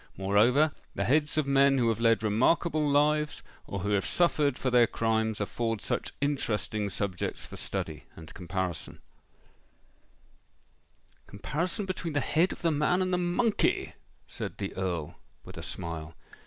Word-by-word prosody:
Moreover, 115 +10 +3 0.2
the 100 - 0
heads 150 +5 +2
of 155 - +2
men 140 0 +4
who 120 -2 +2
have 115 -1 -1
led 115 -1 +3
remarkable 150 +8 +2
lives, 150 +1 +2 0.2
or 100 - -4
who 100 +2 -1
have 100 -1 +1
suffered 150 -6 +2
for 130 - -1
their 120 -1 +5
crimes, 110 -1 0
afford 110 +2 -2
such - - -2
interesting 110 - -1
subjects 95 -2 -3
for - - -10
study - - -4
and 80 -1 -11
comparison——" 90 -3 -4 2.3
"Comparison 170 - -3
between 175 -4 -4
the 145 - +2
head 160 +6 +2
of - - -8
the 165 - +3
man 155 +5 +2
and 185 0 -1
the 180 - +2
monkey!" 190 +6 +1 0.3
said - - -6
the 100 - -5
Earl 90 -5 -3 0.3
with - - -10
a - - -6
smile. 80 -2 -5
120 Hz, 150 wpm, -29 LUFS, 100-150 Hz, 2.3 s, their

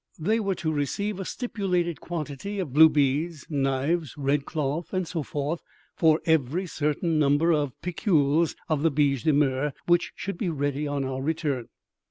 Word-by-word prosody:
They 215 +8 +1
were 200 -3 0
to 160 -3 -2
receive 195 +8 -2
a 190 - -4
stipulated 180 - -2
quantity 165 +4 -5
of 175 -10 -3
blue 160 +2 +8
beads, 150 +2 0
knives, 140 +2 0
red 140 0 0
cloth, 155 +2 -2
and 185 -2 -1
so 165 -1 -3
forth, 145 +3 -3 0.3
for 160 -1 +4
every 160 +3 +1
certain 155 0 0
number 145 +3 +3
of 145 -4 -1
piculs 165 -3 +2
of 155 -3 0
the 165 - +4
biche 140 -4 +1
de 155 - +5
mer 140 0 +1
which 175 0 +2
should 195 -3 -5
be 190 - 0
ready 145 -1 -1
on 140 -1 -1
our 130 0 -3
return. 145 -5 -1
155 Hz, 170 wpm, -26 LUFS, 140-170 Hz, 0.3 s, blue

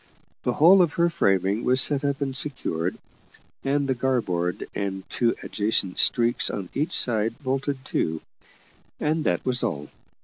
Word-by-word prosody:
The 125 - -1
whole 180 +8 +6
of 170 -4 +1
her 170 0 +1
framing 100 - +1
was 130 +1 +2
set 145 +1 +3
up 140 0 -2
and 135 -2 -2
secured, 90 - -1 0.7
and 140 +1 0
the 130 - +1
garboard 115 -9 -1
and 95 -1 -4
two 120 -1 +1
adjacent 100 -3 +1
streaks 120 -1 +3
on 95 -3 -5
each 155 +5 -1
side 115 -1 +2
bolted 135 0 -3
to: 80 0 0 0.8
and 155 +1 0
that 90 -1 0
was 125 -1 +1
all. 75 -11 -3
125 Hz, 150 wpm, -24 LUFS, 100-140 Hz, 0.8 s, whole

